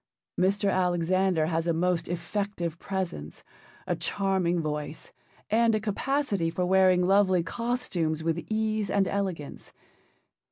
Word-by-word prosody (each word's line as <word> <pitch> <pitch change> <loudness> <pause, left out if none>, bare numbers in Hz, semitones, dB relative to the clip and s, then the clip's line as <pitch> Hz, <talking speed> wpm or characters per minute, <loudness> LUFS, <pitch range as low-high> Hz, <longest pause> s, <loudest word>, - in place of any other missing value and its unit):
Mr. 195 +2 +2
Alexander 180 -1 +2
has 165 +1 -1
a 170 - +2
most 175 +1 0
effective 175 -1 -3
presence, 180 - -4 0.4
a - - 0
charming 190 -3 0
voice, 150 -1 -4 0.4
and 225 0 +4
a - - +1
capacity 215 - -1
for 180 +2 -1
wearing 185 -1 +4
lovely 190 -2 +4
costumes 185 -9 -2
with 165 +1 -1
ease 215 -1 0
and 195 -2 +2
elegance. 185 -7 -4
185 Hz, 120 wpm, -27 LUFS, 170-200 Hz, 0.4 s, and